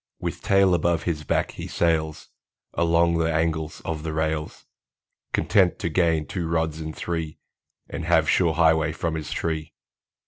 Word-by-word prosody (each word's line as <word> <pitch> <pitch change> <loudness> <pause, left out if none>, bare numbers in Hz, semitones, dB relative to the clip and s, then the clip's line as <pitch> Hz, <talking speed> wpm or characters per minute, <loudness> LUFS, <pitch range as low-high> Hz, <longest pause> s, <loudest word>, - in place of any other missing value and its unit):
With - - -4
tail 95 -2 +4
above 85 -1 +1
his 75 -3 -2
back, - - 0
he - - -7
sails 80 -2 0 0.4
Along 85 0 +2
the 80 0 +1
angles 80 -1 -1
of 80 -2 -3
the 80 0 -4
rails, 80 0 -2 0.7
Content 95 -5 +3
to 85 - -2
gain 80 -2 +2
two 85 +3 -4
rods 80 -1 -1
in 80 0 -4
three, 80 -1 -4 0.5
And - - -5
have - - +3
sure 85 -4 +3
highway 80 -1 +3
from 80 0 -2
his 80 -2 -4
tree. 80 -1 -3
80 Hz, 160 wpm, -24 LUFS, 80-85 Hz, 0.7 s, tail